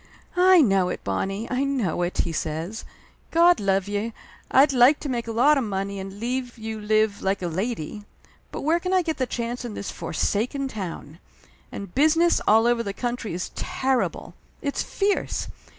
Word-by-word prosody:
"I 365 Hz, -1 st, +6 dB
know 195 Hz, -7 st, +3 dB
it, -, -, -5 dB
Bonnie, 195 Hz, +4 st, -2 dB
I 255 Hz, +2 st, +1 dB
know 255 Hz, -, -1 dB
it!" 175 Hz, +1 st, -2 dB
he 170 Hz, -, -3 dB
said. 165 Hz, +6 st, -3 dB, 0.5 s
"God 345 Hz, +1 st, +5 dB
love 195 Hz, -1 st, +1 dB
ye, 205 Hz, +3 st, -2 dB, 0.4 s
I'd 275 Hz, +2 st, +5 dB
like 255 Hz, +4 st, +6 dB
to 290 Hz, -, -4 dB
make 235 Hz, -2 st, -2 dB
a -, -, -3 dB
lot 275 Hz, +6 st, +4 dB
of -, -, -1 dB
money 200 Hz, -1 st, -3 dB
and 195 Hz, +1 st, -8 dB
leave 245 Hz, +1 st, -3 dB
you 220 Hz, -1 st, -5 dB
live 215 Hz, -1 st, +1 dB
like 195 Hz, 0 st, -1 dB
a -, -, 0 dB
lady. 205 Hz, +2 st, -4 dB, 0.5 s
But -, -, -5 dB
where 325 Hz, +4 st, +2 dB
can 365 Hz, +2 st, -2 dB
I 370 Hz, -1 st, +4 dB
get 320 Hz, -2 st, -2 dB
the 255 Hz, -, -1 dB
chance 240 Hz, +1 st, -3 dB
in 235 Hz, -4 st, -6 dB
this 200 Hz, -, -5 dB
forsaken 210 Hz, -, -1 dB
town? 175 Hz, -, -7 dB, 0.5 s
And 200 Hz, -3 st, -7 dB
business 325 Hz, +4 st, +4 dB
all 220 Hz, +2 st, +5 dB
over 240 Hz, -1 st, +3 dB
the 200 Hz, -3 st, -4 dB
country 240 Hz, -4 st, -3 dB
is 180 Hz, -, -4 dB
terrible 265 Hz, -1 st, -1 dB, 0.3 s
it's 280 Hz, -1 st, -2 dB
fierce! 400 Hz, 0 st, -1 dB
230 Hz, 180 wpm, -24 LUFS, 195-270 Hz, 0.5 s, I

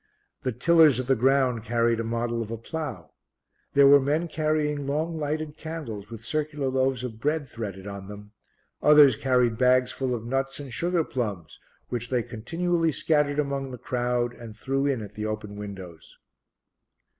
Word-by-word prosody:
The 130 Hz, -3 st, -1 dB
Tillers 155 Hz, 0 st, +5 dB
of 130 Hz, -, -2 dB
the 135 Hz, +1 st, +3 dB
Ground 130 Hz, -2 st, +2 dB
carried 115 Hz, 0 st, +1 dB
a -, -, -1 dB
model 115 Hz, +1 st, -2 dB
of 110 Hz, -, -5 dB
a 115 Hz, -, -4 dB
plough. 120 Hz, -, -6 dB, 0.6 s
There 140 Hz, 0 st, +7 dB
were 140 Hz, +1 st, +8 dB
men 150 Hz, +5 st, 0 dB
carrying 155 Hz, -2 st, -1 dB
long 155 Hz, +4 st, -1 dB
lighted 155 Hz, 0 st, -3 dB
candles 130 Hz, -11 st, -6 dB
with 115 Hz, -1 st, -9 dB
circular 150 Hz, -1 st, -1 dB
loaves 130 Hz, -1 st, 0 dB
of 115 Hz, -3 st, -6 dB
bread 150 Hz, +3 st, -1 dB
threaded 100 Hz, -6 st, -7 dB
on 100 Hz, -1 st, -7 dB
them; 105 Hz, 0 st, -10 dB, 0.5 s
others 150 Hz, -4 st, +7 dB
carried 125 Hz, -2 st, +1 dB
bags 125 Hz, 0 st, +4 dB
full 130 Hz, -2 st, -2 dB
of 115 Hz, -1 st, -6 dB
nuts 135 Hz, +3 st, -2 dB
and 140 Hz, -4 st, -8 dB
sugar 175 Hz, +5 st, +1 dB
plums 105 Hz, -, -4 dB, 0.3 s
which 120 Hz, -1 st, -4 dB
they 125 Hz, -2 st, +1 dB
continually 165 Hz, +9 st, -1 dB
scattered 150 Hz, -1 st, +1 dB
among 140 Hz, -2 st, -1 dB
the 125 Hz, -, -7 dB
crowd 120 Hz, 0 st, -1 dB
and 115 Hz, -3 st, -11 dB
threw 135 Hz, +4 st, -1 dB
in 130 Hz, -6 st, -1 dB
at 105 Hz, 0 st, -10 dB
the 105 Hz, +1 st, -4 dB
open 105 Hz, -1 st, -5 dB
windows. 95 Hz, -5 st, -9 dB
130 Hz, 170 wpm, -26 LUFS, 115-145 Hz, 0.6 s, were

